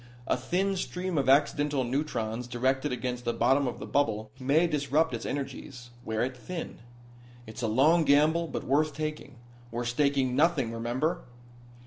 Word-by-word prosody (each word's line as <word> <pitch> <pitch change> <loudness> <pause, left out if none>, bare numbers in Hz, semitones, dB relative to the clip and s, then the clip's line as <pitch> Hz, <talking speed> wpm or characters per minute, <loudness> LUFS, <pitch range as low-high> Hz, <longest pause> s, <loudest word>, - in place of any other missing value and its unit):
A - - +1
thin 185 +10 0
stream 180 0 -3
of 135 -1 +1
accidental 145 0 +3
neutrons 120 -3 -2
directed 130 +4 0
against 125 -1 -3
the 120 - -1
bottom 135 +4 +3
of 125 - -4
the - - -7
bubble 110 -6 0
may 140 +6 +3
disrupt 150 -2 +1
its 115 - -4
energies 135 -3 -6
wear 110 0 -1
it 130 +1 -3
thin. 165 +8 -7 0.7
It's 110 +3 -8
a 115 - 0
long 150 +10 +4
gamble, 155 +3 +3
but - - -4
worth 150 +2 +1
taking. 155 -3 -5 0.3
We're 120 +1 -3
staking 130 0 +1
nothing, 145 -6 +2
remember?" 120 +7 -1
135 Hz, 155 wpm, -28 LUFS, 120-150 Hz, 0.7 s, long